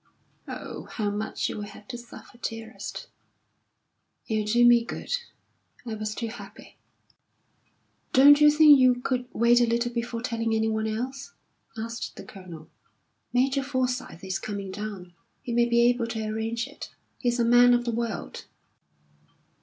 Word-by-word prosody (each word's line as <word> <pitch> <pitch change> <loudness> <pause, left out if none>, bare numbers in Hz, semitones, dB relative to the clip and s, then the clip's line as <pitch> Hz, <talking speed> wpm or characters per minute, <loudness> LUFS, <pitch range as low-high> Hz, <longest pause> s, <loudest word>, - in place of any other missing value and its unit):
"Oh, - - -7
how 210 -3 -1
much 210 +1 -2
you - - -5
will 210 - -5
have 205 0 -13
to 250 - -5
suffer, 240 0 -12
dearest!" 225 -1 -6 1.2
"It'll 215 -2 -1
do 240 +1 +5
me 240 -1 +6
good. - - -7 0.7
I 230 - -4
was 215 0 -4
too 230 - -3
happy." 230 - -12 1.3
"Don't 285 +3 +7
you 300 - +8
think 300 -1 +7
you 255 -1 +5
could 250 0 -2
wait 235 +1 +4
a 240 - +3
little 235 +1 0
before 235 0 -3
telling 230 -2 -1
anyone 220 0 0
else?" 260 - -5 0.4
asked 230 +1 -5
the - - -9
Colonel. 175 -5 -11 0.6
"Major 265 +2 +2
Forsyth 255 -7 -3
is 190 0 -3
coming 200 -2 -5
down. 195 -3 -7 0.3
He 240 - -4
may 240 0 +3
be 235 0 +4
able 240 -1 +2
to 225 -1 -4
arrange 225 +2 -2
it; - - -10 0.3
he's 240 -1 0
a 235 - +3
man 245 +1 +6
of 240 0 -1
the 235 - 0
world." 230 0 -4
235 Hz, 155 wpm, -26 LUFS, 220-245 Hz, 1.3 s, you